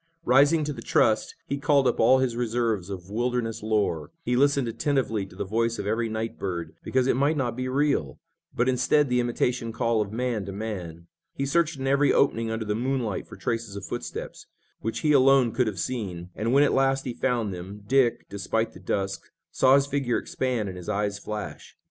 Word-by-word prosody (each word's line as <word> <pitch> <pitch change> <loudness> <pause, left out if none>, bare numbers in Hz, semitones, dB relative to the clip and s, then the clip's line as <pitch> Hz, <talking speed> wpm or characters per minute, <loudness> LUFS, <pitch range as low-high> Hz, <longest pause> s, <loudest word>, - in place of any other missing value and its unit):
Rising 145 +5 +5
to 150 0 -2
the - - -8
trust, 110 -1 +2
he 140 - -3
called 140 -1 +3
up 125 - 0
all 125 +4 +6
his 130 -3 0
reserves 115 -5 -1
of 95 -1 -7
wilderness 120 0 -1
lore. 105 -8 0
He 125 - 0
listened 140 -1 +3
attentively 115 -4 -1
to 90 - -16
the 95 - -3
voice 115 +3 0
of - - -4
every 115 +2 0
night 110 +1 -4
bird, 85 -4 -4
because 130 -1 +1
it 130 - +2
might 145 +4 +2
not 120 -4 -1
be 130 +1 -3
real, 135 - 0 0.3
but 120 - 0
instead 135 +3 +3
the 125 0 +2
imitation 120 -1 0
call 115 -1 +1
of 100 -1 -3
man 120 -2 -1
to - - -4
man. 95 -6 -6 0.3
He 135 - -1
searched 155 +1 +1
in 135 - -4
every 140 +2 +3
opening 115 -5 +2
under 110 0 -3
the 105 - 0
moonlight 120 -2 -2
for - - -10
traces 115 -4 -3
of 100 -1 -6
footsteps, - - -6 0.3
which 115 +2 -3
he 155 - +2
alone 135 -3 +5
could 120 +1 +1
have 105 -3 -3
seen, 90 -6 -4
and, 115 +2 -2
when 140 +2 +5
at 145 - +2
last 135 0 +2
he 125 - -3
found 120 -5 -1
them, 95 +4 -8
Dick, 130 +1 +2
despite 110 +3 -2
the - - -12
dusk, 95 -1 -2 0.3
saw 130 +1 +5
his 140 0 +4
figure 140 -4 0
expand 125 -5 -2
and 90 -1 -6
his 90 - -8
eyes 100 0 -1
flash. 105 0 -7
115 Hz, 205 wpm, -26 LUFS, 105-130 Hz, 0.3 s, all